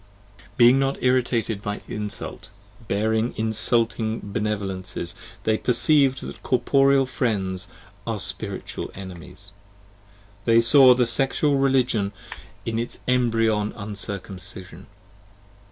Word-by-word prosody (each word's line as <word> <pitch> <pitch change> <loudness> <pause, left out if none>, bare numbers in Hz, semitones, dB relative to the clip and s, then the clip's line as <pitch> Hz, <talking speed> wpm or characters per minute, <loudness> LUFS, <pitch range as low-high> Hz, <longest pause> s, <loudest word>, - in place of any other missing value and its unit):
Being 125 +2 +6
not 135 0 0
irritated 120 -4 +1
by 105 0 -4
insult, 105 -1 -5 0.4
bearing 110 +3 0
insulting 110 0 0
benevolences, 100 -4 -3
10 - - -21 0.2
They 110 0 +2
percieved 135 +1 +3
that - - -8
corporeal 135 +1 +3
friends 100 -7 -1 0.4
are 115 -2 -1
spiritual - - -4
enemies: 95 +1 -10 0.9
They 115 -1 +5
saw 125 +2 +7
the 125 -1 +2
Sexual 135 +4 +1
Religion 125 -7 +1 0.5
in 115 0 -2
its 120 - -4
embryon 115 -4 +1
Uncircumcision. 95 -3 -7
110 Hz, 100 wpm, -24 LUFS, 100-125 Hz, 0.9 s, saw